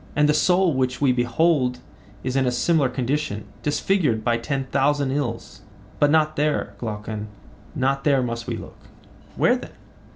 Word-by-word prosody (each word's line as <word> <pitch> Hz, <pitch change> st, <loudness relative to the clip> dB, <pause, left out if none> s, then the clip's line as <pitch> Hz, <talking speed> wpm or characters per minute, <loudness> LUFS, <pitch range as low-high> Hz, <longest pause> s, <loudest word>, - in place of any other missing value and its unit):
And 150 Hz, 0 st, +4 dB
the 150 Hz, -, +4 dB
soul 180 Hz, +2 st, +3 dB
which 130 Hz, -1 st, -1 dB
we 140 Hz, -3 st, +3 dB
behold 125 Hz, +2 st, +1 dB, 0.5 s
is 130 Hz, 0 st, -2 dB
in 135 Hz, -1 st, +2 dB
a -, -, +2 dB
similar 135 Hz, +3 st, +2 dB
condition, 125 Hz, -4 st, -2 dB, 0.2 s
disfigured 150 Hz, -, +1 dB
by 120 Hz, 0 st, +2 dB
ten 135 Hz, +3 st, -2 dB
thousand 140 Hz, 0 st, +2 dB
ills. 130 Hz, -5 st, -4 dB, 0.4 s
But 145 Hz, -, +4 dB
not 155 Hz, 0 st, +3 dB
there, 150 Hz, +1 st, 0 dB
Glaucon, 105 Hz, -1 st, -5 dB, 0.5 s
not 135 Hz, +1 st, 0 dB
there 140 Hz, -3 st, +3 dB
must 115 Hz, -1 st, -4 dB
we -, -, -2 dB
look. -, -, -11 dB, 0.6 s
Where -, -, +3 dB
then? -, -, -8 dB
135 Hz, 160 wpm, -23 LUFS, 120-150 Hz, 0.6 s, And